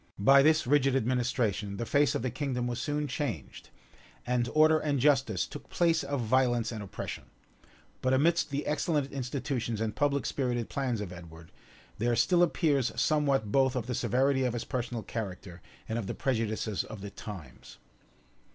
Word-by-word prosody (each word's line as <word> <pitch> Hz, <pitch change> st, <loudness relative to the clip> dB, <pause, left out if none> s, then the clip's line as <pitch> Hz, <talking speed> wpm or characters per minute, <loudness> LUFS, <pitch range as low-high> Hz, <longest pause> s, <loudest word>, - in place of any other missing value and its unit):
By 135 Hz, +8 st, +6 dB
this 155 Hz, +2 st, +4 dB
rigid 135 Hz, 0 st, +3 dB
administration, 115 Hz, -5 st, 0 dB
the 115 Hz, -, -3 dB
face 140 Hz, +5 st, +2 dB
of -, -, -2 dB
the 130 Hz, -, -1 dB
kingdom 130 Hz, -2 st, -2 dB
was 120 Hz, -1 st, -3 dB
soon 150 Hz, 0 st, -1 dB
changed; 125 Hz, -, -5 dB, 0.6 s
and 120 Hz, -1 st, 0 dB
order 155 Hz, 0 st, +6 dB
and 145 Hz, -3 st, 0 dB
justice 130 Hz, -8 st, +2 dB
took -, -, -10 dB
place 165 Hz, -3 st, +2 dB
of 140 Hz, -1 st, -2 dB
violence 120 Hz, 0 st, +2 dB
and 110 Hz, -2 st, -5 dB
oppression: 100 Hz, -, -6 dB, 0.8 s
but 130 Hz, -, +1 dB
amidst 160 Hz, +6 st, +3 dB
the 140 Hz, +1 st, -3 dB
excellent 150 Hz, -2 st, 0 dB
institutions 125 Hz, -3 st, -3 dB
and 110 Hz, -1 st, -2 dB
public 140 Hz, -1 st, +1 dB
spirited 120 Hz, -4 st, -1 dB
plans 125 Hz, -6 st, -2 dB
of 95 Hz, -3 st, -6 dB
Edward, 80 Hz, -2 st, -12 dB, 0.5 s
there 120 Hz, +1 st, +1 dB
still 175 Hz, +7 st, +3 dB
appears 150 Hz, -7 st, +2 dB
somewhat 140 Hz, -6 st, +1 dB
both 130 Hz, 0 st, +3 dB
of 125 Hz, -3 st, -2 dB
the 125 Hz, -, -3 dB
severity 130 Hz, +3 st, +1 dB
of 125 Hz, -2 st, 0 dB
his 120 Hz, -, -3 dB
personal 120 Hz, -3 st, -3 dB
character 95 Hz, -5 st, -6 dB, 0.3 s
and 115 Hz, +1 st, -2 dB
of 105 Hz, -, -5 dB
the -, -, -4 dB
prejudices 110 Hz, -4 st, -1 dB
of 105 Hz, -, -9 dB
the 100 Hz, 0 st, -7 dB
times. 95 Hz, -, -10 dB
125 Hz, 170 wpm, -29 LUFS, 110-140 Hz, 0.8 s, By